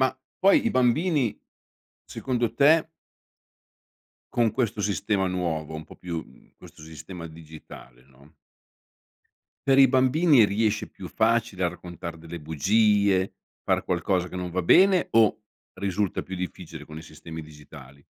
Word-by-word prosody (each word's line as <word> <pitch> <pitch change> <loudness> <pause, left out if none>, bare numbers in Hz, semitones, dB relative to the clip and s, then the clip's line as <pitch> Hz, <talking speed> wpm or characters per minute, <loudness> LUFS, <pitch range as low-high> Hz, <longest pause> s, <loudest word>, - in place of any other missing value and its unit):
Ma 130 0 +1 0.2
poi 200 +8 +4
i - - +2
bambini, 130 - +1 0.7
secondo 120 -3 -2
te 155 +3 +4 1.4
con 120 -2 +2
questo 110 -5 -1
sistema 100 -1 0
nuovo 80 -4 -3
un 80 0 -7
po' - - -15
più, 85 -2 -5
mhmm, 65 - -22
questo - - -15
sistema 85 +2 -9
digitale, 80 -6 -13
no 70 +4 -22 1.3
per 135 0 +4
i 135 -2 +8
bambini 130 0 +4
riesce 105 +1 0
più - - -10
facile 110 -4 0
a - - +3
raccontar 85 -1 -8
delle 85 +1 -8
bugie, 100 +5 +2 0.3
far - - +1
qualcosa 90 +1 -1
che 90 - -8
non 90 -1 -4
va 95 +2 -1
bene 185 - +5
o 110 -1 +4 0.4
risulta 100 0 -1
più 95 0 -7
difficile 85 -4 -7
con 75 +1 -10
i - - -10
sistemi 80 0 -10
digitali? 70 -2 -14
95 Hz, 140 wpm, -25 LUFS, 80-115 Hz, 1.4 s, i